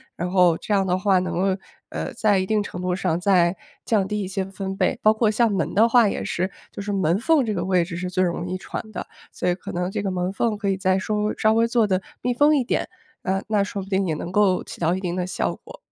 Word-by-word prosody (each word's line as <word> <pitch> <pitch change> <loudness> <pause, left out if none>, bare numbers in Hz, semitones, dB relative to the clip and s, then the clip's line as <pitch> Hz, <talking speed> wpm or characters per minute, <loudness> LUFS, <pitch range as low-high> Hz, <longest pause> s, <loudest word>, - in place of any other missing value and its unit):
然 180 +1 -3
后 180 -3 +4
这 210 - -3
样 195 -1 +2
的 180 - +2
话 190 -1 +3
能 180 -1 -3
够， 190 +2 0 0.3
呃， - - -4
在 205 -3 +2
一 185 - 0
定 210 +1 +1
程 180 -2 -7
度 180 0 0
上 180 -3 0
再 180 -1 +3 0.3
降 205 -4 +1
低 210 0 -2
一 190 - -3
些 195 0 -2
分 195 0 -5
贝， - - +1
包 215 - +6
括 220 0 +2
像 220 +1 +2
门 195 - -1
的 225 +4 +4
话 235 -2 +5
也 - - -2
是， 185 +2 -1 0.2
就 - - -7
是 205 0 -3
门 185 -1 +1
缝 295 +2 +3
这 215 - -1
个 180 -3 -2
位 185 -2 +3
置 170 0 -6
是 180 +1 -3
最 185 0 +1
容 175 0 -2
易 185 +1 -3
传 185 - -5
的， - - -4 0.3
所 - - -1
以 - - +3
可 - - -8
能 180 +1 -2
这 200 - -2
个 200 - -2
门 180 0 -1
缝 215 +1 -1
可 205 -1 -1
以 195 - 0
再 190 -1 +2
稍 195 +3 -2
微 210 0 0
稍 215 - +3
微 230 +1 +3
做 235 -1 +3
得 190 -2 0 0.2
密 250 0 0
封 295 +4 +4
一 270 - +2
点， 240 - -1 0.4
呃， 195 +1 -1
那 210 -2 +2
说 200 0 -3
不 195 - -12
定 190 -1 +1
也 160 - 0
能 170 +3 -5
够 195 -2 +3
起 - - -10
到 170 +1 +1
一 190 - -4
定 180 -1 -3
的 180 -1 -1
效 - - -1
果。 - - -13
195 Hz, 300 characters per minute, -23 LUFS, 180-210 Hz, 0.4 s, 包